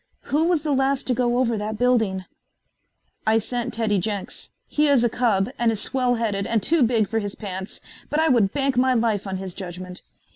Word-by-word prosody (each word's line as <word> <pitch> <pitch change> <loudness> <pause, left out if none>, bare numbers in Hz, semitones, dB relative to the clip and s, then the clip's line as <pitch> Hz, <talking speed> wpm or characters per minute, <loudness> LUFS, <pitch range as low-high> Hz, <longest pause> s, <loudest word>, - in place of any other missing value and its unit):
Who 310 +3 +3
was 340 -3 +1
the 305 - -1
last 270 0 +1
to 255 - +1
go 240 0 +1
over 240 -2 +1
that 210 +1 -3
building?" 220 -7 +1 1.0
"I 220 +1 +5
sent 240 +2 -2
Teddy 215 -3 +1
Jenks. 200 +1 -4 0.2
He 300 0 +1
is 275 -4 +4
a 240 - +3
cub 220 -3 +1
and 235 -1 +3
is 220 - -2
swell 250 0 +1
headed 205 -4 -1
and 225 -3 0
too 330 -1 +3
big 225 -3 +3
for 225 - -1
his 205 -2 -4
pants, 190 -2 -6 0.3
but 295 - 0
I 320 - +3
would 230 -9 +3
bank 275 -2 0
my 255 0 +3
life 220 -4 0
on 190 -1 -3
his 190 -1 -6
judgment. 180 -1 -7
230 Hz, 210 wpm, -23 LUFS, 200-255 Hz, 1.0 s, I